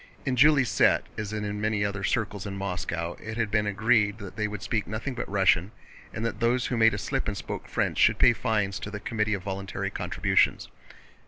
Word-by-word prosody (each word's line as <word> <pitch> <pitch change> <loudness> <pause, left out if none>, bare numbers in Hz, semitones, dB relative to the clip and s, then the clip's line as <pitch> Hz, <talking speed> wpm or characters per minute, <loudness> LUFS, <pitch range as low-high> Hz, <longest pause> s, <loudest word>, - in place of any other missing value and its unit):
In 130 -2 0
Julie's 140 -1 +5
set, - - +4
as 105 -1 -4
in 105 -1 -3
many 105 -1 +1
other 100 0 -3
circles 105 -3 -1
in 100 -1 -5
Moscow, 90 -3 -3
it 110 +1 -6
had 115 -3 -1
been 105 -1 +1
agreed 105 0 +2
that 100 -4 -9
they 105 -1 -1
would 105 -1 -7
speak 110 -2 -1
nothing 110 +7 -4
but 125 - -5
Russian 95 -1 +3 0.4
and 110 - -4
that 115 - -3
those 120 +1 +2
who 125 - -1
made 110 -2 +4
a - - -4
slip 135 +6 -2
and 100 -2 -2
spoke 95 - -6
French - - -1
should - - +5
pay - - +6
fines 100 -2 -1
to - - -6
the 105 0 -6
Committee 110 -3 -1
of 95 - -7
Voluntary 95 0 -4
Contributions. - - +1
105 Hz, 215 wpm, -27 LUFS, 100-115 Hz, 0.4 s, pay